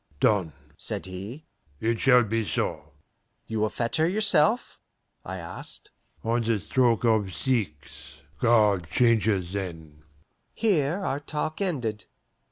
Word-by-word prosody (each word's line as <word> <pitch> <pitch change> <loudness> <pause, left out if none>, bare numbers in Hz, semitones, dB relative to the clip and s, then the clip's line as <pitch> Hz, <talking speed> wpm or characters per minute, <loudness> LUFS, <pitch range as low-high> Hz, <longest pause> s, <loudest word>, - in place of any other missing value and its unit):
"Done," 95 -8 +2 0.2
said - - -4
he. 100 +11 -8 0.3
"It 115 +3 0
shall 125 -2 +6
be 115 +1 -1
so." - - -3 0.5
"You 110 -1 -3
will 110 0 +2
fetch 115 +1 -1
her 160 +1 +3
yourself?" 215 +2 +2 0.4
I 95 +1 -5
asked. 85 -1 -6 0.3
"On 115 +1 +1
the 115 -1 +1
stroke 120 +3 +2
of 110 -4 +2
six. 80 - -3 0.2
Guard 105 -7 +3
changes 105 -4 +2
then." 80 -6 -6 0.5
Here 185 -4 +1
our 135 - -1
talk 155 +3 -4
ended. 120 - -2
115 Hz, 125 wpm, -26 LUFS, 95-135 Hz, 0.5 s, shall